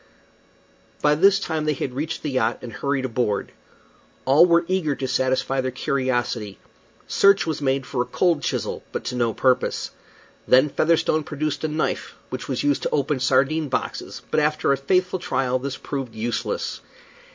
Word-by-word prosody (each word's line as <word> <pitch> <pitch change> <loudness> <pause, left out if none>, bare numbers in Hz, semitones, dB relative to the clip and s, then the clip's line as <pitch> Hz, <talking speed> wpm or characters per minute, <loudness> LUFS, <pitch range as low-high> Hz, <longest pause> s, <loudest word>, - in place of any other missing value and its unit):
By 150 0 +5
this 195 +5 +5
time 160 -5 -2
they 150 -1 +1
had 130 -1 -4
reached 155 +5 -4
the 150 - -2
yacht 115 -3 +1
and 120 -2 -7
hurried 140 -2 -1
aboard. 115 -4 -1 0.7
All 145 +7 +6
were 170 0 +4
eager 180 -6 0
to 135 - -3
satisfy 130 +1 +1
their 130 - -1
curiosity. 120 -5 -1 0.5
Search 200 0 +4
was 155 -2 -3
made 135 -1 0
for 125 -1 -2
a - - 0
cold 160 +5 +1
chisel, - - -2
but - - -4
to - - -4
no 120 -2 +1
purpose. 125 +4 +1 0.6
Then 130 +4 +5
Featherstone 155 +1 +2
produced 150 0 -3
a - - +1
knife 155 0 -2 0.2
which - - -5
was 130 -2 -1
used 145 -1 +2
to - - -1
open 140 -1 0
sardine 135 +4 +2
boxes, - - -4
but - - +3
after 150 -1 +1
a - - +4
faithful 180 +6 +1
trial 130 -6 0
this 135 +1 -4
proved 135 -5 -5
useless. 115 +1 -3
140 Hz, 170 wpm, -23 LUFS, 130-155 Hz, 0.7 s, All